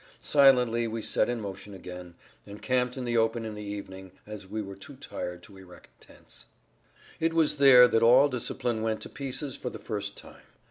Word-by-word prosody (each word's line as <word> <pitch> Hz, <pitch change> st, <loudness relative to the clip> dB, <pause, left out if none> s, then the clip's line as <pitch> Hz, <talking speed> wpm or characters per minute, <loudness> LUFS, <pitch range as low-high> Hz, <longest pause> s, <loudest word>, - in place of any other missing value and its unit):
Silently 125 Hz, -5 st, +4 dB
we 115 Hz, 0 st, -4 dB
set 110 Hz, +1 st, 0 dB
in 120 Hz, -1 st, -2 dB
motion 100 Hz, -1 st, -8 dB
again, 90 Hz, -2 st, -10 dB, 0.3 s
and 100 Hz, +1 st, -11 dB
camped 125 Hz, 0 st, 0 dB
in 130 Hz, -, -4 dB
the 120 Hz, -1 st, -2 dB
open 115 Hz, 0 st, +1 dB
in 110 Hz, -, -6 dB
the 105 Hz, -, -8 dB
evening, 95 Hz, -2 st, -8 dB
as 105 Hz, -2 st, -9 dB
we 110 Hz, +3 st, -5 dB
were 100 Hz, -2 st, -6 dB
too 115 Hz, +9 st, -12 dB
tired 90 Hz, -10 st, -7 dB
to 100 Hz, -, -15 dB
erect 90 Hz, -2 st, -16 dB
tents. -, -, -13 dB, 0.7 s
It 165 Hz, 0 st, 0 dB
was 155 Hz, -2 st, +2 dB
there 130 Hz, -3 st, +8 dB
that 115 Hz, -, +1 dB
all 125 Hz, +5 st, +6 dB
discipline 120 Hz, -3 st, -2 dB
went 110 Hz, -1 st, -2 dB
to -, -, -8 dB
pieces 135 Hz, 0 st, -5 dB
for 125 Hz, -, -5 dB
the -, -, -9 dB
first 100 Hz, -2 st, -5 dB
time. -, -, -14 dB
115 Hz, 195 wpm, -27 LUFS, 100-125 Hz, 0.7 s, there